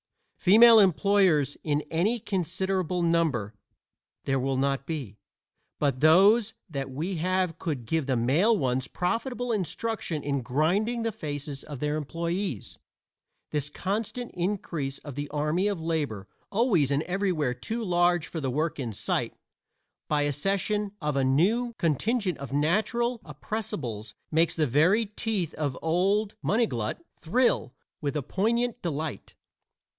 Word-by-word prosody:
(Female 225 Hz, +4 st, +8 dB
employers 190 Hz, -6 st, +3 dB
in 150 Hz, -1 st, +1 dB
any 200 Hz, +9 st, +1 dB
considerable 185 Hz, -2 st, -1 dB
number 160 Hz, -11 st, +1 dB, 0.7 s
there 135 Hz, -1 st, 0 dB
will 135 Hz, +1 st, 0 dB
not 135 Hz, 0 st, 0 dB
be, 135 Hz, -, -5 dB, 0.6 s
but 140 Hz, -3 st, 0 dB
those 200 Hz, -, +5 dB
that 140 Hz, -6 st, -4 dB
we 165 Hz, +8 st, -3 dB
have 180 Hz, 0 st, 0 dB
could 145 Hz, -9 st, -3 dB
give 160 Hz, +3 st, -1 dB
the 130 Hz, -, +1 dB
male 160 Hz, -, +3 dB
ones 130 Hz, -2 st, 0 dB
profitable 245 Hz, +6 st, -2 dB
instruction 200 Hz, -5 st, -2 dB
in 140 Hz, -1 st, -1 dB
grinding 185 Hz, -, +1 dB
the 225 Hz, -, 0 dB
faces 145 Hz, -7 st, -6 dB
of 145 Hz, -4 st, -8 dB
their 150 Hz, +1 st, -1 dB
employees.) 170 Hz, -, -3 dB, 0.7 s
This 150 Hz, -1 st, 0 dB
constant 220 Hz, +8 st, -3 dB
increase 170 Hz, -7 st, -2 dB
of 145 Hz, -, -9 dB
the 145 Hz, +2 st, -5 dB
army 150 Hz, +6 st, 0 dB
of 200 Hz, -4 st, -1 dB
labor 150 Hz, -12 st, -2 dB, 0.2 s
always 200 Hz, -, +3 dB
and 140 Hz, +2 st, +1 dB
everywhere 180 Hz, -8 st, 0 dB
too 225 Hz, -, -4 dB
large 175 Hz, -3 st, +2 dB
for 160 Hz, -, -5 dB
the 135 Hz, -, -1 dB
work 155 Hz, +4 st, -1 dB
in 120 Hz, -5 st, -3 dB
sight -, -, -2 dB, 0.7 s
by 150 Hz, -1 st, +1 dB
accession 195 Hz, +7 st, 0 dB
of 150 Hz, -3 st, -2 dB
a 135 Hz, -, +2 dB
new 210 Hz, -, +2 dB
contingent 185 Hz, -, 0 dB
of 140 Hz, -2 st, -7 dB
natural 220 Hz, -, +1 dB
oppressibles 140 Hz, -, -5 dB, 0.2 s
makes 160 Hz, +1 st, +2 dB
the 155 Hz, -, +2 dB
very 165 Hz, -, +3 dB
teeth 205 Hz, -4 st, -2 dB
of 145 Hz, -4 st, -2 dB
old 195 Hz, +6 st, +1 dB
Munniglut 160 Hz, -, 0 dB, 0.2 s
thrill 210 Hz, -, +1 dB, 0.3 s
with 145 Hz, 0 st, -1 dB
a 145 Hz, -, -2 dB
poignant 235 Hz, -, 0 dB
delight. 155 Hz, -, -4 dB
165 Hz, 135 wpm, -27 LUFS, 145-200 Hz, 0.7 s, Female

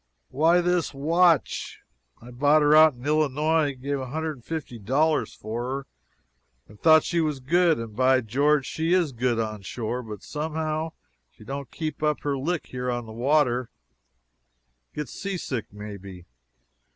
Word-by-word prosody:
"Why, 165 Hz, +5 st, +3 dB
this 175 Hz, -4 st, 0 dB
watch. 165 Hz, +1 st, +2 dB, 0.4 s
I 120 Hz, +2 st, -12 dB
bought 145 Hz, +5 st, +3 dB
her 150 Hz, +1 st, +5 dB
out 155 Hz, -2 st, +7 dB
in 120 Hz, +2 st, -12 dB
Illinois 150 Hz, 0 st, +1 dB
gave 140 Hz, +2 st, -3 dB
$150 145 Hz, 0 st, -2 dB
for 110 Hz, +3 st, -4 dB
her 135 Hz, +2 st, -4 dB, 0.8 s
and 105 Hz, 0 st, -17 dB
I -, -, -37 dB
thought 160 Hz, -1 st, +6 dB
she 170 Hz, -1 st, 0 dB
was 150 Hz, -3 st, -1 dB
good. 170 Hz, +5 st, +3 dB
And, 115 Hz, -2 st, -7 dB
by 130 Hz, +1 st, +4 dB
George, 140 Hz, +5 st, +2 dB
she 165 Hz, +2 st, -1 dB
is 175 Hz, -6 st, +2 dB
good 120 Hz, -1 st, 0 dB
onshore, 110 Hz, +2 st, -3 dB
but 105 Hz, -4 st, -9 dB
somehow 155 Hz, +1 st, -3 dB, 0.4 s
she -, -, -18 dB
don't 135 Hz, +2 st, -6 dB
keep 155 Hz, -3 st, -5 dB
up 150 Hz, -2 st, 0 dB
her 145 Hz, -1 st, -1 dB
lick 155 Hz, +5 st, -2 dB
here 125 Hz, 0 st, -4 dB
on 120 Hz, -1 st, -2 dB
the 110 Hz, -, -10 dB
water 125 Hz, -1 st, +1 dB, 1.3 s
gets 150 Hz, -5 st, -5 dB
seasick 175 Hz, -, -4 dB
may 105 Hz, 0 st, -8 dB
be. 95 Hz, -2 st, -11 dB
140 Hz, 150 wpm, -25 LUFS, 120-155 Hz, 1.3 s, out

